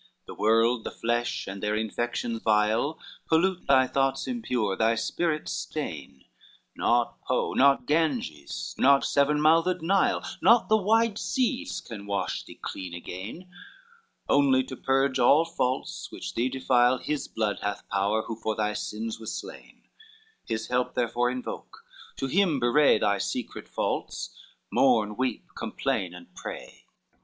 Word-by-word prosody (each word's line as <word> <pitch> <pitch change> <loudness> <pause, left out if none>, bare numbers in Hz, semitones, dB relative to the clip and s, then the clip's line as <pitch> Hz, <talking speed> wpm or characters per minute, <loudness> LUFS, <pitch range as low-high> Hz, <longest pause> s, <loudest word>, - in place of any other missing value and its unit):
VIII - - -33
"The - - -9
world, 115 +2 +3
the - - -4
flesh, 120 +1 -2
with 95 0 -7
their 105 0 0
infection 115 +1 -2
vile 110 +8 +2 0.3
Pollute 180 +3 +1
the 130 -1 +5
thoughts 135 0 0
impure, 125 - -1
thy 115 +2 +2
spirit 155 +7 -1
stain; 70 - -5 0.5
Not 120 0 +1
Po, - - -1
not 135 -2 +4
Ganges, 130 - -1
not 140 +1 +5
seven 145 +1 +2
mouthed 165 +3 +3
Nile, 190 +3 +2 0.2
Not 235 0 +5
the 220 - +5
wide 220 +1 +2
seas, 265 +2 -1
can 105 -3 -9
wash 100 -2 -2
thee - - -13
clean 90 -2 -6
again, 95 - -8 0.8
Only 135 -2 +4
to 130 0 -8
purge 135 +1 +1
all 145 +7 +5
faults 135 -6 -3
which - - -6
thee 120 +3 0
defile 130 -1 +3
His 150 +3 -3
blood 110 -2 -2
hath 105 0 -4
power 100 +3 +1
who 115 - -5
for 110 -1 -3
thy 105 -1 0
sins 110 +2 -4
was 110 - -5
slain: - - -11 0.6
His 110 -1 -3
help 125 0 0
therefore 120 0 +1
invoke, 125 0 -7 0.3
to - - -3
him 165 0 +2
bewray 120 +1 +4
Thy 100 -1 +1
secret 125 +4 -4
faults, - - -3 0.4
mourn, 110 -6 +3
weep, 130 -2 -2
complain 90 -2 -2
and 90 -1 -14
pray." - - -9
125 Hz, 145 wpm, -27 LUFS, 110-150 Hz, 0.8 s, the